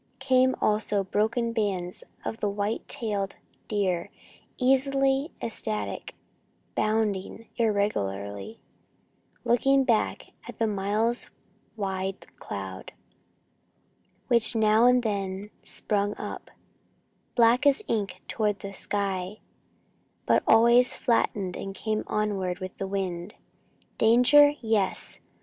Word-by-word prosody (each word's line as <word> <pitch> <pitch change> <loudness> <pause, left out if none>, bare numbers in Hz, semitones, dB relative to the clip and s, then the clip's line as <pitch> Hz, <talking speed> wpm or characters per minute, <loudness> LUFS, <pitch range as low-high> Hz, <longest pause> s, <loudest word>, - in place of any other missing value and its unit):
Came 260 -1 +3
also 210 -1 +1
broken 225 +4 0
bands 190 -5 -2 0.2
of 225 - -4
white 205 +1 -2
tailed 205 -4 -3 0.3
deer, 185 -5 -1 0.5
easy, 270 +2 +2
elastic, 215 -1 -3 0.6
bounding 215 0 -1
irregularly, 105 - -1 0.8
looking 270 +3 +3
back 235 -5 0 0.2
at - - -9
the 225 - +1
miles 215 +3 -1 0.5
wide 195 -1 -3
cloud, 95 -2 -7 1.3
which 235 -2 +3
now 220 +1 +4
and 250 0 +4
then 200 -1 -3
spun 205 0 -1
up, - - -7 0.9
black 240 +4 +4
as 285 +8 +3
ink 200 -5 -2
toward 210 -2 -1
the 200 0 -7
sky, 195 -1 -2 0.9
but - - +3
always 235 +2 +6
flattened 200 -5 0
and 195 0 -6
came 215 +1 -2
onward 195 -4 -1
with 185 0 -7
the 195 - -2
wind. 190 -1 -4 0.6
Danger? 250 +6 +6
Yes! 220 -4 0
210 Hz, 100 wpm, -27 LUFS, 195-235 Hz, 1.3 s, always